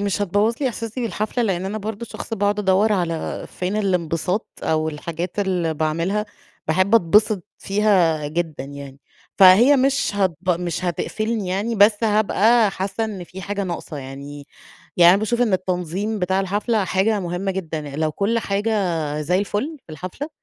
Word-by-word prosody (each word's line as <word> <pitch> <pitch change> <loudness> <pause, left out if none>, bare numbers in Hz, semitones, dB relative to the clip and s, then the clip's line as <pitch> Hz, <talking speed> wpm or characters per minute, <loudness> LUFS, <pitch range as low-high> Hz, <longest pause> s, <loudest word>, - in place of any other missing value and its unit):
مش 205 0 -1
هتبوّظ 205 +4 +1
لي 265 - +2
إحساسي 230 +1 -5
بالحفلة، 230 +1 -2
لإن 190 -4 -1
أنا 210 +3 -3
برضو 215 +2 -5
شخص 225 - -6
باقعد 205 0 0
أدور 205 +2 +3
على 170 -4 -2
فين 185 +3 -3
الانبساط، 180 0 0 0.2
أو 155 0 0
الحاجات 170 +5 -5
اللي 180 -5 0
باعملها 165 +7 -1 0.4
باحبّ 185 +6 +2
أتبسّط 210 0 +3
فيها 185 -7 +2
جدًا، 155 -2 -3
يعني، 140 -1 -10 0.4
فهي 210 +10 +8
مش 275 +1 +2
هتب 190 -4 +1 0.3
مش 175 +1 -3
هتقفّلني، 215 +3 -2
يعني، 205 +5 -1
بس 210 +2 +4
هابقى 215 +1 +3
حاسّة 195 +4 -3
إنّ 200 -5 -5
فيه 190 +2 -10
حاجة 200 +1 -3
ناقصة، 170 -3 -5
يعني. 140 +1 -8 0.5
يعني 175 0 +8
أنا 195 - +4
باشوف 235 +3 -1
إنّ 220 -5 +1
التنظيم 185 +3 -1
بتاع 190 +1 +1
الحفلة 205 +2 0
حاجة 200 +3 +1
مهمّة 180 +2 -2
جدًا، 165 -5 -4 0.2
لو 155 -1 0
كُلّ 220 +6 0
حاجة 205 +1 -1 0.5
زيّ 180 +5 +1
الفُلّ 215 +10 -2
في 160 - -11
الحفلة، 185 - -6
195 Hz, 160 wpm, -21 LUFS, 170-215 Hz, 0.5 s, فهي